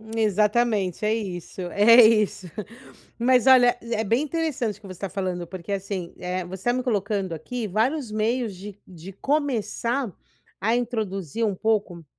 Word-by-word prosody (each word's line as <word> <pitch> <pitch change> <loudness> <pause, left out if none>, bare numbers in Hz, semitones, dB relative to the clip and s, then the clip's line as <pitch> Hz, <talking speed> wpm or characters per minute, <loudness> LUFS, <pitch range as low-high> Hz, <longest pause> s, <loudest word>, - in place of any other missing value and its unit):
Exatamente, 210 -2 +1
é 215 - +2
isso, 190 -6 -5
é 230 +5 +7
isso. 215 -4 +2 0.7
Mas 250 +1 +3
olha, 250 -2 +6
é 235 0 -3
é - - +1
bem 230 +8 +2
interessante 300 - -2
o - - -32
que 200 - -11
você 185 - -7
está 190 +2 -5
falando, 185 -2 -3
porque, 185 +2 -6
assim, 190 -3 -4
eh, 180 0 -3
você 185 +1 -8
está 240 - +2
me 255 - 0
colocando 205 -5 -1
aqui 220 +9 -4
vários 235 - 0
meios 220 0 -1
de 200 +2 -9
de 180 +1 -10
começar 245 - -1 0.5
a 225 +3 +2
introduzir 220 - -2
um 210 - 0
pouco, 200 -5 -1
215 Hz, 160 wpm, -24 LUFS, 190-240 Hz, 0.7 s, é